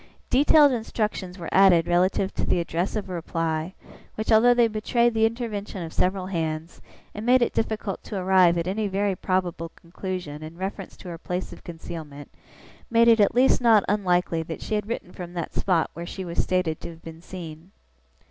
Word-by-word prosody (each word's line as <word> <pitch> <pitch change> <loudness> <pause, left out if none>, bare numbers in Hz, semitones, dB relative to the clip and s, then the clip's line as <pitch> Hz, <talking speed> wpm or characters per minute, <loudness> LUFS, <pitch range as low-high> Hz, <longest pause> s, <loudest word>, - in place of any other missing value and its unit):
Detailed 290 +2 +6
instructions 215 -5 -3
were 170 -3 -7
added 185 -4 +6
relative 185 +2 +1
to - - -2
the - - +1
address 170 +3 -2
of 210 -2 -3
a 185 - -6
reply, 165 0 -3 0.4
which, 220 +2 -3
although 240 +3 +6
they 240 -1 +5
betrayed 235 +2 +1
the 225 0 +4
intervention 215 -5 -5
of 160 - -8
several 185 0 0
hands, 165 -2 -4 0.3
and 210 - -6
made 250 +1 +4
it - - -1
difficult 220 -3 -2
to 205 - -5
arrive 185 -2 +4
at 170 - -1
any 205 +3 -1
very 200 0 0
probable 180 -3 -2
conclusion 175 -3 -6
in 155 +2 -9
reference 190 +2 -6
to - - -12
her 165 -1 -7
place 180 +2 -4
of - - -14
concealment, 160 -4 -9 0.6
made 230 0 +4
it 230 -1 +6
at 205 - +3
least 255 +1 +4
not 225 -4 +5
unlikely 180 -4 +1
that 160 0 -6
she - - -4
had 210 -1 -1
written 225 -6 -5
from 175 -1 -8
that 170 -2 -5
spot 175 -4 +1
where 170 +1 -7
she 190 +1 -6
was 170 -1 -1
stated 180 -4 -1
to - - -6
have 165 -1 -13
been 165 0 -10
seen. 170 -2 -9
185 Hz, 195 wpm, -25 LUFS, 170-215 Hz, 0.6 s, Detailed